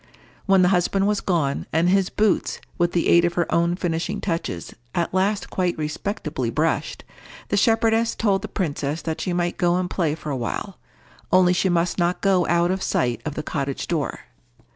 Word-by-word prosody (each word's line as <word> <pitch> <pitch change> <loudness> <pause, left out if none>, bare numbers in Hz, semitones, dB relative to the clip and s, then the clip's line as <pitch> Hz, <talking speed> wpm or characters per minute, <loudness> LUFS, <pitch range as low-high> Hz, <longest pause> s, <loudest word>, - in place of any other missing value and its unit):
When 195 -1 +5
the 180 - +4
husband 195 +1 +2
was 210 0 +1
gone, 160 -7 -1
and 165 +2 +2
his 190 0 +3
boots, 210 -2 +1 0.2
with 175 0 +2
the 170 - +1
aid 170 - +6
of 175 0 +1
her 175 - +2
own 170 +1 +2
finishing 165 -2 -2
touches, 165 - -3 0.2
at 170 0 -1
last 195 +2 0
quite 180 -2 0
respectably 155 +7 -3
brushed, - - -1 0.5
the - - +1
shepherdess 225 0 +2
told 200 -3 +1
the - - -5
princess 150 -4 -3
that 160 -1 -3
she 180 - -2
might 175 0 -1
go 175 -1 +2
and 180 0 0
play 165 -4 -1
for 155 -2 -6
a - - -1
while, 130 - -4 0.5
only 180 0 +5
she 190 +1 +1
must 175 +1 +1
not 175 +1 +1
go 190 -3 +3
out 170 +1 +2
of 190 0 -2
sight 120 - 0
of 150 -2 -4
the 155 - -3
cottage 140 -3 -3
door. 160 -5 -2
175 Hz, 190 wpm, -23 LUFS, 165-190 Hz, 0.5 s, aid